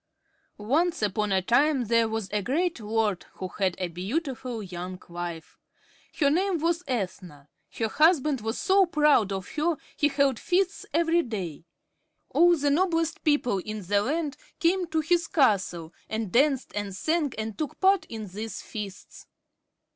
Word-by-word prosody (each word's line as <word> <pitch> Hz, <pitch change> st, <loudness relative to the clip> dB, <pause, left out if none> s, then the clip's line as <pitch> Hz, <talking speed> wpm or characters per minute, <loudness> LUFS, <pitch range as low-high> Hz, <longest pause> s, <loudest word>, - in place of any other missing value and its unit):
Once 290 Hz, +8 st, 0 dB
upon 210 Hz, 0 st, 0 dB
a 190 Hz, -1 st, +2 dB
time 270 Hz, +4 st, +3 dB
there 230 Hz, +1 st, +3 dB
was 220 Hz, -2 st, -3 dB
a 210 Hz, 0 st, 0 dB
great 320 Hz, -, 0 dB
lord, 215 Hz, -3 st, -1 dB
who 185 Hz, -, -6 dB
had 190 Hz, -3 st, +1 dB
a 180 Hz, -, -2 dB
beautiful 235 Hz, -, -4 dB
young 180 Hz, 0 st, -6 dB
wife. 170 Hz, -2 st, -7 dB, 0.6 s
Her 285 Hz, -3 st, +3 dB
name 370 Hz, +3 st, +1 dB
was 335 Hz, +2 st, 0 dB
Ethna. 180 Hz, -, -4 dB, 0.3 s
Her 225 Hz, -, +1 dB
husband 300 Hz, -1 st, +3 dB
was 225 Hz, +2 st, -3 dB
so 385 Hz, -1 st, +4 dB
proud 300 Hz, -, +3 dB
of 190 Hz, -1 st, -4 dB
her, 310 Hz, +1 st, 0 dB, 0.2 s
he 295 Hz, -, +3 dB
held 275 Hz, -4 st, +1 dB
feasts 375 Hz, +2 st, 0 dB
every 335 Hz, +1 st, +3 dB
day. 185 Hz, -, -5 dB, 0.7 s
All 345 Hz, 0 st, +5 dB
the 285 Hz, -1 st, +1 dB
noblest 330 Hz, 0 st, +1 dB
people 270 Hz, -9 st, +2 dB
in 215 Hz, +2 st, -6 dB
the 200 Hz, +3 st, +2 dB
land 295 Hz, +4 st, -2 dB, 0.2 s
came 360 Hz, +1 st, +2 dB
to 320 Hz, -1 st, 0 dB
his 335 Hz, +1 st, +1 dB
castle 185 Hz, -, +1 dB, 0.2 s
and 220 Hz, -3 st, -3 dB
danced 270 Hz, +2 st, +2 dB
and 205 Hz, -2 st, -4 dB
sang 310 Hz, -, 0 dB
and 220 Hz, -1 st, -4 dB
took 305 Hz, -3 st, -5 dB
part 390 Hz, 0 st, +4 dB
in 220 Hz, -2 st, -6 dB
these 210 Hz, +4 st, -6 dB
feasts. 205 Hz, -3 st, -8 dB
240 Hz, 155 wpm, -27 LUFS, 200-320 Hz, 0.7 s, All